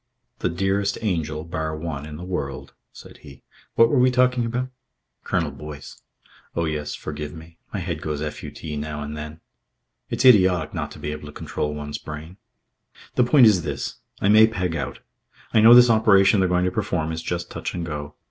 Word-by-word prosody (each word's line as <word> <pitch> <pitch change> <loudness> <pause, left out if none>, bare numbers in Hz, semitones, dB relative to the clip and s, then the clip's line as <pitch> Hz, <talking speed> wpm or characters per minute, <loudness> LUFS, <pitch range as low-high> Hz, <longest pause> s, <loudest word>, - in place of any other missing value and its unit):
"The - - 0
dearest 95 +3 0
angel, 80 -6 -1
bar 80 -2 -4
one, 75 -2 -5
in 75 - -8
the 85 - -8
world." 70 -7 -5 0.2
said - - -13
he. 70 -2 -15 0.3
"What 115 - +6
were 130 +2 +2
we 130 +1 +5
talking 125 -1 +2
about?" 125 +2 -2 0.5
"Colonel 80 -5 -1
Boyce." 75 +1 -10 0.5
"Oh, 85 - 0
yes. 75 -2 -3
Forgive 75 0 -6
me. 80 +1 -13
My 100 - -3
head 85 -3 -4
goes 75 -2 -3
FUT 75 0 -6 0.2
now 75 0 -4
and 75 +1 -6
then. 75 +1 -8 0.7
It's 130 - -1
idiotic 95 -9 +5
not - - -3
to - - -12
be 75 - -4
able 75 0 -7
to - - -9
control 75 0 -4
one's 75 0 -5
brain.... 80 +4 -9 0.8
The 125 - +3
point 125 +1 +6
is 105 -5 +5
this. 70 -4 -4 0.2
I - - +1
may 110 +2 +7
peg 90 -6 -2
out. 70 -3 -4 0.5
I 110 - +5
know 115 +2 +9
this 120 -1 +8
operation 105 -2 +5
they're 95 -1 +2
going 90 0 +2
to 90 - 0
perform 90 -6 -1
is 80 0 -4
just 85 0 -4
touch - - -5
and 85 -1 -3
go. 75 -2 -6
85 Hz, 195 wpm, -23 LUFS, 75-100 Hz, 0.8 s, know